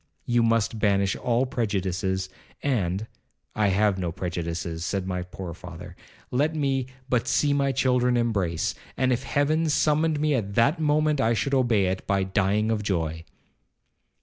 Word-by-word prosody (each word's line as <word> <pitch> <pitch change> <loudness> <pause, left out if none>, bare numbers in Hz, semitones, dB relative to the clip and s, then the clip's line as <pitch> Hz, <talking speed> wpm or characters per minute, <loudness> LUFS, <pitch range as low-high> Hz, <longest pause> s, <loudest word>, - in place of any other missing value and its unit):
You 120 0 +2
must 115 -1 +1
banish 100 -2 +2
all 120 +1 +1
prejudices, 95 -5 -1 0.4
and—' 105 -7 0 0.5
'I 105 -1 +2
have 100 0 +2
no 90 -2 -2
prejudices!' 85 -2 -4
said 95 +2 -2
my 90 -1 -2
poor 90 -1 -7
father; 90 0 -10 0.4
'let 150 +6 +1
me 135 -4 0 0.2
but 125 -3 0
see 145 -1 +2
my 140 -1 +2
children 125 -1 +2
embrace, 100 -9 0 0.2
and 130 -1 +2
if 125 - -1
Heaven 155 +4 +1
summoned 150 +1 +2
me 150 0 +2
at 100 -6 -2
that 140 +8 +3
moment, 150 -1 +2
I 115 -1 +2
should 140 +6 -1
obey 120 -7 +3
it 95 0 -2
by 100 -1 +2
dying 100 +3 +1
of 110 -2 0
joy.' 80 -5 -2
110 Hz, 155 wpm, -25 LUFS, 95-135 Hz, 0.5 s, that